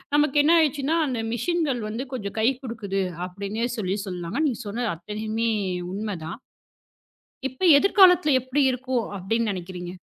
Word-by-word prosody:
நமக்கு 295 -1 +2
என்ன 320 - +5
ஆயிடுச்சுன்னா, 300 0 +1
அந்த 250 -4 -2
மெஷின்கள் 275 0 0
வந்து 235 +5 -4
கொஞ்சம் 210 -4 -5
கைக்குடுக்குது 225 -5 -1 0.2
அப்படின்னே 200 +5 -3
சொல்லிச் 200 0 -2
சொல்லாங்க. 180 +4 -4
நீங்கச் 245 -4 -4
சொன்ன 235 +3 -2
அத்தனையுமே 215 +5 -2 0.4
உண்ம 205 +1 -3
தான். 170 +7 -6 1.1
இப்ப, 260 0 -17 0.2
எதிர்காலத்துல 365 -3 +5
எப்படி 260 +3 0
இருக்கும் 255 -1 -1
அப்டின்னு 225 +5 -1
நெனைக்கிறீங்க? 180 -2 -6
230 Hz, 130 wpm, -24 LUFS, 200-270 Hz, 1.1 s, என்ன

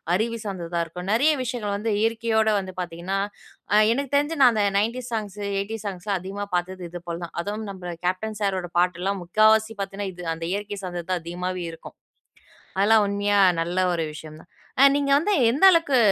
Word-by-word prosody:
அருவி 230 +4 -1
சார்ந்ததா 175 -4 -3
இருக்கும். 180 +3 -7
நிறைய 280 +8 +4
விஷயங்கள் 235 -5 -3
வந்து 215 +1 -1
இயற்கையோட 225 -1 +1
வந்து 190 -1 -7
பார்த்தீங்கன்னா, 175 +3 -3 0.5
அ - - +6 0.2
எனக்கு 275 +1 -3
தெரிஞ்சு 290 +3 +1
நான் 250 -2 +8
அந்த 215 -2 +1
90ஸ் 235 +4 -1
சாங்ஸ், 210 -2 -4 0.2
80ஸ் 215 +1 -6
சாங்ஸ்லாம் 190 +1 -3
அதிகமா 195 +3 -5
பார்த்தது 185 +1 -3
இது 175 +1 -7
போல 170 -1 -3
தான். 170 - -8
அதுவும் 210 +4 -4
நம்ம 180 -2 -7
கேப்டன் 205 +4 -1
சாரோட 190 -3 -1
பாட்டுல்லாம் 180 +2 0
முக்காவாசி 215 +4 +3
பார்த்தேன்னா, 195 0 -4
இது 175 0 -9
அந்த 165 0 -6
இயற்கை 205 0 -4
சார்ந்தது 175 -2 -5
தான் 180 -2 0
அதிகமாவே 180 +1 -4
இருக்கும். 165 - -12 0.8
அதெல்லாம் 210 +2 +5
உண்மையா 205 0 +1 0.2
நல்ல 175 +2 -1
ஒரு 165 - -1
விஷயம் 155 0 -10
தான். - - -22 0.3
அ - - +9
நீங்க 285 -1 +1
வந்து 355 +8 +1 0.2
எந்த 270 +9 -1
அளவுக்கு 330 -6 +3
200 Hz, 180 wpm, -24 LUFS, 180-220 Hz, 0.8 s, அ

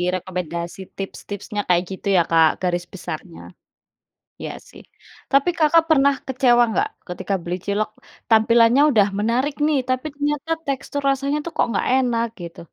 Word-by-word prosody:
rekomendasi 175 -1 -5 0.2
tips-tipsnya 205 +2 -5
kayak 175 0 +3
gitu 190 +1 -6
ya, - - +6
Kak, 160 -1 +6
garis 175 -1 -1
besarnya. 170 -1 -7 1.0
Iya - - -5 0.2
sih. - - -14 0.5
Tapi 275 +5 +4
Kakak 320 +1 +4
pernah 280 -2 +4
kecewa 245 -2 +4
nggak, 415 - +1 0.2
ketika 180 +2 -4
beli 175 +1 -3
cilok 205 +1 -1 0.4
tampilannya 230 +3 +5
udah 205 -4 +4
menarik 250 +7 0
nih 300 -2 +2
tapi 255 +3 -1
ternyata 295 +2 -2
tekstur 275 +1 -3
rasanya 275 +2 0
tuh 340 - -4
kok - - +3
nggak 195 - -1
enak 235 -3 +1 0.2
gitu? 170 - -9
230 Hz, 145 wpm, -21 LUFS, 185-275 Hz, 1.0 s, ya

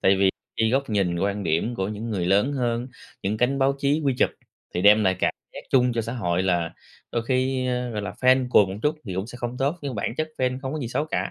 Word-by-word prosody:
tại 95 0 +4
vì 95 0 +4 0.3
cái 110 0 +2
góc 135 -2 0
nhìn, 90 -5 +1
quan 100 +1 -1
điểm 95 +10 0
của 95 -1 -2
những 110 +2 -5
người 90 -4 -1
lớn 100 +9 +3
hơn, 120 -3 -1 0.4
những 100 +3 -1
cánh 125 +4 +1
báo 135 0 +3
chí 145 +3 +1
quy 135 -2 +2
chụp, - - +3 0.4
thì 90 - 0
đem 105 +1 +6
lại 95 -1 +2
cảm - - +1 0.2
giác - - -6
chung 125 -2 +4
cho 115 - 0
xã 115 +2 -4
hội 90 -7 0
là 85 -3 0 0.4
đôi 115 - 0
khi, 130 0 +1
ơ, 125 -1 -1
gọi 105 -2 -3
là, 100 - -4
fan 130 +4 +3
cuồng 105 -5 +5
một 95 - -5
chút 150 +1 +2
thì 95 - -5
cũng 95 +3 -2
sẽ 120 - -9
không 120 +1 -4
tốt, 140 +6 0
nhưng 135 -4 -3
bản 105 +3 -2
chất 155 0 -1
fan 130 0 0
không 135 +2 -3
có 155 - -3
gì 120 -5 -3
xấu 145 +5 -1
cả. - - -2
115 Hz, 270 wpm, -24 LUFS, 100-130 Hz, 0.4 s, đem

